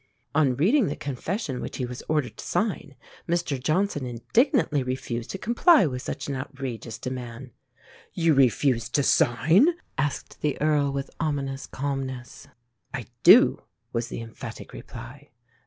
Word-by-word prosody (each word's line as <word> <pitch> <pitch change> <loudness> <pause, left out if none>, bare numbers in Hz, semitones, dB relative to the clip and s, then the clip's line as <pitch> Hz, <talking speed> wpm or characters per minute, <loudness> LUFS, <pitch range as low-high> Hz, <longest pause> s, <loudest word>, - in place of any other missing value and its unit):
On 145 -4 +3
reading 210 - +3
the 145 - -2
confession 145 - -4
which - - -5
he 125 - -1
was 125 0 -7
ordered 150 -7 0
to - - -7
sign, - - -2 0.3
Mr 170 -6 0
Johnson 155 +1 0
indignantly 155 - +2
refused 125 -2 -4
to - - -4
comply 240 - +5
with 125 -4 -3
such - - -5
an 140 - -2
outrageous 130 -4 -6
demand. 125 0 -6 0.6
"You 165 -3 +3
refuse 125 -3 +3
to 140 +3 +1
sign?" 160 - +4 0.3
asked 140 0 -3
the 150 -2 -1
Earl 150 -2 +2
with 135 0 -4
ominous 140 -4 -2
calmness. 135 -1 -5 0.4
"I - - -5 0.2
do," - - +7 0.3
was 115 0 -1
the - - -6
emphatic 115 -1 -9
reply. 130 +5 -10
135 Hz, 140 wpm, -26 LUFS, 125-155 Hz, 0.6 s, do